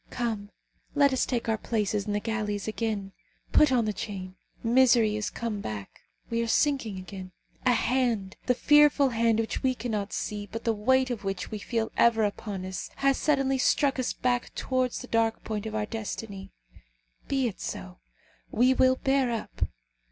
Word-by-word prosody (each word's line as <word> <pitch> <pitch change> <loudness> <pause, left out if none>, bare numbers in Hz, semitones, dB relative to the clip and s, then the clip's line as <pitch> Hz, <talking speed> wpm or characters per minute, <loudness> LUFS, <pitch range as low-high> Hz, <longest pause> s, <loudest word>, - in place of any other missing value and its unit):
Come, 220 -4 -3 0.5
let 285 -2 +5
us 260 - +1
take 240 -3 -1
our 220 -1 +1
places 210 -3 -1
in 205 - -1
the 205 - +1
galleys 210 -2 -2
again. 215 -3 -2 0.4
Put 300 -3 +5
on 240 -3 +3
the 215 - -1
chain. 190 -3 -6 0.3
Misery 235 -2 +4
is 215 0 -2
come 225 -3 -4
back. 105 - -7 0.3
We 230 0 +1
are 230 - -1
sinking 250 -5 +1
again. 185 -1 -8 0.3
A 250 - +6
hand, 235 -5 0
the 250 - +3
fearful 295 0 +5
hand 230 -1 +2
which 225 - -2
we 260 -1 +1
cannot 215 -4 -3
see, 205 -1 -4
but 225 +1 -5
the 230 - +2
weight 260 +4 +2
of 230 -4 -4
which 195 -1 -3
we 215 - -4
feel 225 +1 -2
ever 230 -2 +4
upon 200 -2 -3
us, 185 0 -5
has 275 -1 +2
suddenly 270 -3 +2
struck 275 +1 +2
us 255 - 0
back 245 -1 -1
towards 255 -1 -1
the 250 - -9
dark 225 -1 +1
point 215 0 -3
of 215 - -5
our 215 -1 0
destiny. 210 -3 -6 0.8
Be 270 -2 +1
it 210 - -6
so. - - -6 0.5
We 250 +3 +4
will 260 0 +4
bear 270 -1 +1
up. 230 -2 -3
225 Hz, 180 wpm, -28 LUFS, 210-255 Hz, 0.8 s, A